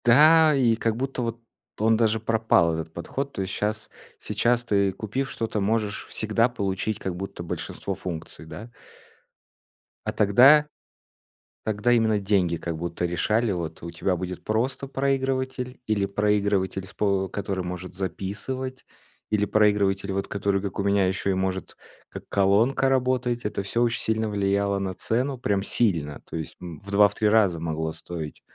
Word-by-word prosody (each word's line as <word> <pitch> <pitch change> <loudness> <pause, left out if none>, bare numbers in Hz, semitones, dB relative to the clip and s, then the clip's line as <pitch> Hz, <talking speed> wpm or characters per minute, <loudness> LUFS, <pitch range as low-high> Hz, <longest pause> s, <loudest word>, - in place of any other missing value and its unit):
Та, 155 +5 +7
и 120 -4 +3
как 115 -1 0
будто 135 0 -2
вот 115 -1 -3 0.4
он 110 +1 +4
даже 110 -1 +2
пропал, 110 -7 +2
этот 80 0 -4
подход. 135 +11 -4
То - - -3
есть 95 0 -3
щас, 110 +1 -2 0.3
сейчас 120 0 +1
ты 100 -4 +2
купив 110 +8 -3
что-то 115 -3 -2
можешь 105 +1 -1
всегда 110 +2 +1
получить 100 -2 -2
как 95 -2 -3
будто 95 -1 -6
большинство 85 - -4
функций, 80 -2 -7
да? 110 +9 -9 1.3
А - - -1
тогда, 130 +9 +6 1.0
тогда 110 +2 0
именно 110 -3 +3
деньги 95 -4 +1
как 85 0 -4
будто 85 +1 -3
решали, 105 +6 +1
вот 85 -4 -4
у 85 - -5
тебя 90 +3 0
будет 90 0 -5
просто 125 +5 -1
проигрыватель 130 -1 -1
или 105 -2 +1
проигрыватель 100 -2 0
с 95 - -12
по 100 -2 +1
который 100 -2 -3
может 90 +1 -6
записывать 105 +8 -4 0.4
или 105 -1 +2
проигрыватель, 100 -2 +2
вот 95 0 -2
который 100 -1 0
как 100 0 -5
у - - +1
меня 100 -1 +3
еще 95 +1 0
и - - +1
может 95 0 -2 0.3
как - - -9
колонка 100 +8 +3
работать, 125 -2 0
это 105 - -2
всё 100 +4 -1
очень 120 0 0
сильно 110 0 0
влияло 100 -1 +1
на 95 -1 -2
цену, 125 +8 -1
прям 100 -5 0
сильно, 85 -11 0
то - - -6
есть, 80 -3 -6
м, 85 -4 -8
в 100 - -12
2, 100 +1 +6
в - - -9
3 110 - +1
раза, 105 -6 +3
могло 80 -1 -2
стоить 80 -2 -7
105 Hz, 165 wpm, -25 LUFS, 95-115 Hz, 1.3 s, Та